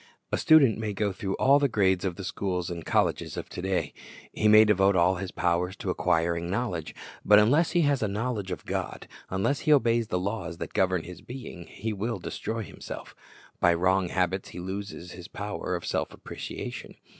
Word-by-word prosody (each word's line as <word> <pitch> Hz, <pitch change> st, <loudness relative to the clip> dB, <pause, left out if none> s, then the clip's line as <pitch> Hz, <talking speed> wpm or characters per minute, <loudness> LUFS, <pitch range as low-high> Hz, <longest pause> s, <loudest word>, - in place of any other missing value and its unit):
A -, -, +1 dB
student 140 Hz, -9 st, +5 dB
may 110 Hz, -2 st, -2 dB
go 100 Hz, +1 st, 0 dB
through 95 Hz, 0 st, -3 dB
all 140 Hz, +2 st, +5 dB
the 140 Hz, -, +3 dB
grades 95 Hz, -6 st, +2 dB
of 90 Hz, -2 st, -1 dB
the 100 Hz, -, -7 dB
schools 90 Hz, -2 st, -2 dB
and 85 Hz, -1 st, -5 dB
colleges -, -, 0 dB
of -, -, -5 dB
to -, -, -6 dB
day. 95 Hz, 0 st, -1 dB, 0.4 s
He 110 Hz, -, +1 dB
may 110 Hz, +1 st, +8 dB
devote 100 Hz, -2 st, +4 dB
all 90 Hz, +1 st, +3 dB
his 95 Hz, 0 st, -4 dB
powers 90 Hz, +2 st, 0 dB
to -, -, -3 dB
acquiring 85 Hz, +1 st, 0 dB
knowledge. 95 Hz, -6 st, -2 dB, 0.3 s
But 105 Hz, -, +7 dB
unless 140 Hz, +11 st, +4 dB
he 175 Hz, -, +4 dB
has 145 Hz, -4 st, +2 dB
a 110 Hz, -, +1 dB
knowledge 105 Hz, -1 st, -2 dB
of 90 Hz, -, -5 dB
God, -, -, -4 dB, 0.2 s
unless 95 Hz, +10 st, 0 dB
he 155 Hz, -, +1 dB
obeys 115 Hz, -5 st, +4 dB
the 90 Hz, -, -1 dB
laws 90 Hz, -3 st, -3 dB
that -, -, -6 dB
govern 95 Hz, -3 st, +1 dB
his 90 Hz, +1 st, -10 dB
being, 120 Hz, -9 st, -9 dB
he 110 Hz, +1 st, -4 dB
will 110 Hz, +4 st, -2 dB
destroy 115 Hz, 0 st, -4 dB
himself -, -, -9 dB, 0.5 s
By 85 Hz, -1 st, +4 dB
wrong 95 Hz, +2 st, +2 dB
habits 95 Hz, +1 st, -1 dB
he -, -, -8 dB
loses 95 Hz, -1 st, -6 dB
his 90 Hz, 0 st, -9 dB
power 100 Hz, -3 st, -4 dB
of 85 Hz, -, -5 dB
self -, -, -2 dB
appreciation. -, -, -7 dB
95 Hz, 195 wpm, -27 LUFS, 90-110 Hz, 0.5 s, may